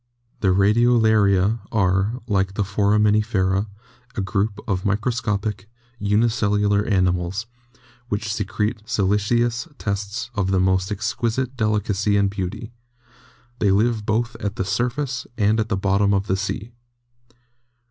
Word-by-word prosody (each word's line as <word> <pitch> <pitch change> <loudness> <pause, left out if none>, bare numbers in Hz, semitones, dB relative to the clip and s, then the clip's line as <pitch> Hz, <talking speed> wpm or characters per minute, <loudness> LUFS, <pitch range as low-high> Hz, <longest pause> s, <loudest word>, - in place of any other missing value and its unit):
The 95 - 0
Radiolaria 105 0 +3
are, 100 +3 +1
like 95 -3 0
the 105 - +1
Foraminifera, 105 -1 +2 0.5
a 110 - -1
group 100 +3 -1
of 95 -3 -1
micro 105 +5 0
scopic, 105 -3 -2 0.3
unicellular 105 -1 +2
animals, 90 0 0 0.6
which 105 +1 -2
secrete 105 +1 -2
siliceous 115 - +1
tests 100 +3 -3
of 100 -4 -1
the 95 -1 +2
most 95 +1 +1
exquisite 115 +4 -2
delicacy 105 -2 +1
and 100 -1 +2
beauty; 100 +4 -5 0.9
they 105 - +2
live 110 +3 +2
both 115 +3 -1
at 100 0 -4
the 95 - -2
surface 125 +6 -2
and 110 0 +2
at 110 0 -1
the 100 - 0
bottom 100 +1 +2
of 100 0 0
the 95 - 0
sea. 100 +3 -4
105 Hz, 125 wpm, -22 LUFS, 100-110 Hz, 0.9 s, Radiolaria